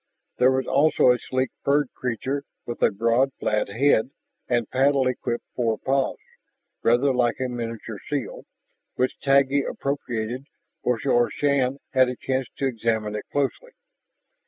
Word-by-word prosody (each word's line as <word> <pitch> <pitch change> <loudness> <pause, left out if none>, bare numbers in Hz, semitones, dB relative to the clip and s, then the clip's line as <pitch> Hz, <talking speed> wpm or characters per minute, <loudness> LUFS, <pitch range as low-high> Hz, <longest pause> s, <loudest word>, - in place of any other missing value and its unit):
There 125 - +6
was 130 -1 0
also 145 -3 +4
a 125 - +1
sleek 130 0 -2
furred 140 -1 +2
creature 130 +3 -3 0.2
with 120 - -6
a - - +5
broad 115 +6 +1
flat 105 -1 0
head 120 +2 +3 0.4
and 120 -3 +1
paddle 135 +1 +3
equipped 120 -2 -2
forepaws, 130 +3 0 0.6
rather 125 +4 +3
like 120 -2 +2
a 130 - 0
miniature 115 -3 -5
seal, 145 -4 -3 0.5
which 130 +1 +1
Taggi 140 0 +4
appropriated 125 -2 -3 0.4
before 120 0 +2
Shann 140 -2 +1 0.2
had 130 -1 +5
a 125 - -4
chance 130 0 -2
to 140 - -1
examine 110 -4 -1
it 105 - -5
closely. 145 - -2
130 Hz, 135 wpm, -24 LUFS, 115-135 Hz, 0.6 s, There